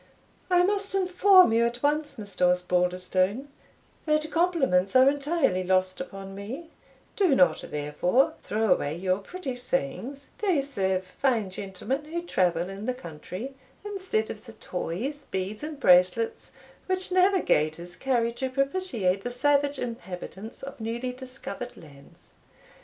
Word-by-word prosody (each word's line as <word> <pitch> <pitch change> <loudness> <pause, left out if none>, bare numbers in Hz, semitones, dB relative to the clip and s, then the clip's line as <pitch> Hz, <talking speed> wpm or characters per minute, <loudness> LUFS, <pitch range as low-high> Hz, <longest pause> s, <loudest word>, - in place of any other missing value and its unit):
"I 355 -1 +5
must 400 +1 0
inform 370 - +6
you 230 +1 +4
at 235 +2 -2
once, 295 +1 +1
Mr. 195 -4 +1
Osbaldistone, 180 +6 +1 0.6
that 305 0 +1
compliments 280 - +2
are 260 +1 +7
entirely 280 - +1
lost 185 +2 +1
upon 195 -6 -8
me; 250 +12 -7 0.4
do 370 -9 +3
not, 270 - +3
therefore, 150 - +1
throw 215 -2 +2
away 145 -3 -2
your 185 +1 0
pretty 270 - -6
sayings 245 - -3
they 365 -9 +2
serve 190 -8 -1
fine 220 0 0
gentlemen 200 +10 -4
who 340 +3 -4
travel 175 - +1
in 195 +3 -7
the 255 - 0
country, 190 - -7 0.3
instead 375 - -1
of 220 +3 -11
the 225 - -10
toys, 245 - -4
beads, 190 +3 -3
and 300 -1 -6
bracelets, 180 +4 +3 0.4
which 370 0 -1
navigators 180 - +2
carry 240 -3 +1
to 260 +2 -3
propitiate 255 - 0
the 245 - -2
savage 285 +3 +2
inhabitants 220 -2 -7
of 275 -1 -8
newly 235 +3 -3
discovered 255 -1 -7
lands. 140 -3 -17
240 Hz, 135 wpm, -27 LUFS, 185-290 Hz, 0.6 s, are